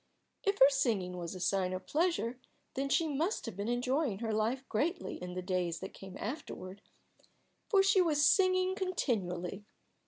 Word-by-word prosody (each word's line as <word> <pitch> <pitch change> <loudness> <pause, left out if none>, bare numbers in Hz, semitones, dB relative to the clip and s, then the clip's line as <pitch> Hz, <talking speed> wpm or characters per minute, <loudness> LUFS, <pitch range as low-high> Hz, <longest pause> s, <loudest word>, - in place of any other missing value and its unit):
If 400 0 +1
her 270 - +8
singing 220 -10 0
was 175 +1 -5
a - - -6
sign 185 0 +1
of 185 - -5
pleasure, 305 -7 0 0.3
then 275 +1 -2
she 325 +3 +3
must 310 +7 -1
have 230 - -6
been 200 +2 -3
enjoying 250 0 0
her 220 0 -2
life 230 +5 0
greatly 310 - -2
in 180 0 -6
the 185 - -3
days 180 -2 -1
that 190 - -7
came 190 -1 -10
afterward, 200 - -6 0.9
for 395 -3 +5
she 390 0 +5
was 300 -4 +3
singing 370 -1 +4
continually. 205 - -2
240 Hz, 165 wpm, -33 LUFS, -, 0.9 s, her